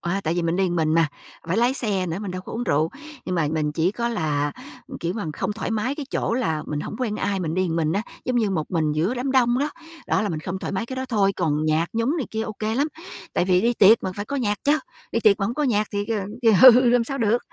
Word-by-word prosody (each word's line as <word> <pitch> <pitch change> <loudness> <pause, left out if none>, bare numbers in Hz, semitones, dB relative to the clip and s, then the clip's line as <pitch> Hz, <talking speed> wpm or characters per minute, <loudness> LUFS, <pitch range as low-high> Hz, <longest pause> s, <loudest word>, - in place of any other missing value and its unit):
a, 180 +3 -1
tại 160 +1 0
vì 175 - 0
mình 165 +1 0
đi 190 - +2
một 175 - -1
mình 160 -1 +1
mà, 165 -1 +4 0.4
phải 170 - 0
lái 240 +3 +3
xe 200 -8 -1
nữa, 165 +1 -3
mình 205 -3 -4
đâu 185 0 -5
có - - -9
uống 240 +2 -3
rượu. 155 -4 +2 0.4
Nhưng 185 - -2
mà 160 -4 +1
mình 150 -2 0
chỉ 165 +4 +1
có 235 +2 -2
là, 150 -9 -1 0.3
ừm, - - -8
kiểu 170 +1 -2
mà, 210 - -3
không 210 - -2
thoải 220 - -4
mái 225 +5 -1
cái 290 -2 -6
chỗ - - -1
là 160 -12 -1
mình 150 -1 -3
hổng - - -6
quen 225 -5 -1
ai, 195 -2 -1
mình 160 -3 -2
đi 185 - +1
một 165 -1 -2
mình 160 -1 +1
á, 200 +4 0 0.2
giống 250 -1 0
như 220 -4 +2
một 160 -5 -2
mình 155 -4 +1
giữa 165 +10 0
đám 260 +2 -2
đông 245 -2 +3
đó, 290 +2 0 0.4
đó, - - +1
là 210 - -1
mình 160 -4 -3
không 180 +3 -4
thoải - - -5
mái 195 +4 -2
cái 260 - -6
đó 260 - -2
thôi, 200 -5 +2
còn 155 -3 0
nhạc 155 +2 +2
nhúng 230 +8 0
này 285 - -2
kia 220 0 -2
OK 215 -1 -7
lắm. 285 +3 +2 0.5
Tại - - +1
vì 180 -1 +3
đi 235 +3 +2
tiệc 215 +2 +6
mà, 185 - -3
phải 205 - -3
có 280 - -4
nhạc 210 -6 0
chớ, 295 +2 +4 0.3
đi 230 - +1
tiệc 205 -3 +4
mà 195 - +1
hổng 230 - -3
có 300 - -1
nhạc 215 -6 +1
thì, 205 0 -2 0.4
ờ, 220 -5 +5
ừ, 250 0 +4
làm 245 -1 +3
sao 275 +3 -4
được, 230 0 +2
205 Hz, 295 wpm, -23 LUFS, 165-235 Hz, 0.5 s, tiệc